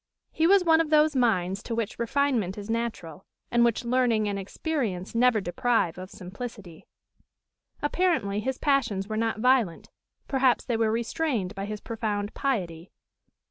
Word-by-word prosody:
His 325 +2 +2
was 395 -1 +6
one 325 -1 +5
of 320 - -2
those 305 -1 +4
minds 195 -6 +1
to 230 - -4
which 225 -2 -3
refinement 235 -6 0
is 205 +2 -5
natural, 220 -8 -4 0.3
and 240 0 +4
which 235 +1 +1
learning 235 -3 +2
and 200 -1 -2
experience 200 - -3
never 235 -1 +4
deprive 185 -1 0
of 185 0 -8
simplicity. 195 -2 -9 1.0
Apparently 295 - +1
his 260 +4 -2
passions 265 -10 +1
were 215 - -4
not 225 0 -1
violent; 250 -9 +2 0.4
perhaps 265 -2 +2
they 240 - -1
were 225 -1 +1
restrained 230 - -1
by 195 -1 -5
his 210 0 -6
profound 210 -2 -3
piety. 180 -11 -2
225 Hz, 150 wpm, -27 LUFS, 200-260 Hz, 1.0 s, was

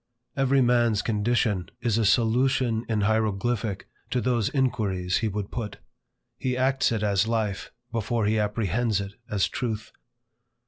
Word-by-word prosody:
Every 135 0 +3
man's 120 -3 +3
condition 105 -4 0
is 115 -2 +1
a 110 - +2
solution 120 +1 +2
in 110 -2 +1
hieroglyphic 110 0 0 0.2
to 125 - 0
those 120 -4 +1
inquiries 100 -9 0
he 110 - 0
would 105 -1 -4
put. 110 -4 -4 0.6
He 125 -1 -1
acts 130 0 +2
it 110 -2 -1
as 100 +1 +2
life, 110 -4 -1 0.2
before 115 0 -1
he 110 +1 +2
apprehends 105 +1 0
it 100 0 -5 0.2
as 100 -2 +1
truth. 110 -3 -4
110 Hz, 140 wpm, -26 LUFS, 105-120 Hz, 0.6 s, Every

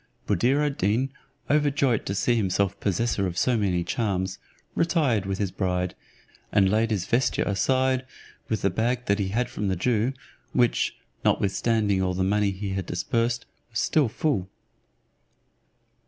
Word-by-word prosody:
Buddir 135 +5 +2
ad 145 -1 -2
Deen, 115 +8 +1 0.4
overjoyed 145 -4 +2
to 100 - -2
see 120 +5 +2
himself 100 -2 0
possessor 100 0 0
of 90 -1 -5
so 125 +5 +2
many 95 -5 +1
charms, 95 -3 -1 0.3
retired 145 - +1
with 95 -1 -1
his 100 -3 -1
bride, 90 -1 -1 0.6
and 95 -2 +4
laid 110 +1 +2
his 100 -5 -1
vesture 120 +5 +1
aside, 130 +6 +1 0.5
with 110 - -1
the 100 - +3
bag 120 +5 0
that 100 +1 +1
he 100 - 0
had 120 +6 0
from 105 - -3
the 95 - +1
Jew; 115 +6 +1 0.4
which, 120 -1 +2 0.3
notwithstanding 100 -1 +1
all 90 -1 0
the 95 - 0
money 105 +1 +2
he 100 +1 -4
had 95 0 -3
dispersed, 115 +6 -1 0.2
was 110 - -6
still 145 -7 +2
full. 105 -8 -1
105 Hz, 155 wpm, -26 LUFS, 95-120 Hz, 0.6 s, and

